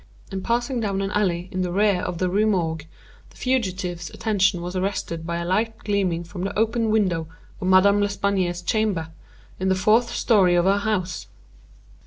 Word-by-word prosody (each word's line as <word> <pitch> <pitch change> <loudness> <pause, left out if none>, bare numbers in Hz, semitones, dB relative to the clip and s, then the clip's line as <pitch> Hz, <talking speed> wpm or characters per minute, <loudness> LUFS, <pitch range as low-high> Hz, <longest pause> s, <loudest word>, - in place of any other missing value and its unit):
In 190 -1 -3
passing 240 +4 -1
down 195 -3 -1
an 195 - -2
alley 180 -4 0
in 185 - -2
the 180 -1 -1
rear 200 -1 +2
of 175 - -3
the 185 - 0
Rue 205 +4 +2
Morgue, 160 -6 -1 0.4
the - - -20
fugitive's 190 -9 -2
attention 200 -5 0
was 180 +1 -5
arrested 185 -3 -3
by 170 0 -2
a 170 - -3
light 220 +5 0
gleaming 190 -5 -1
from 175 +2 -8
the 195 - -3
open 225 +1 +1
window 185 -7 +1 0.3
of 185 - -2
Madame 200 +2 +5
L'Espanaye's 200 -3 0
chamber, 205 -6 0 0.5
in 190 +1 0
the 190 - +3
fourth 220 +5 +3
story 190 -8 +3
of 175 0 +3
her 200 +1 +3
house. 200 -4 -2
190 Hz, 180 wpm, -23 LUFS, 180-210 Hz, 0.5 s, Madame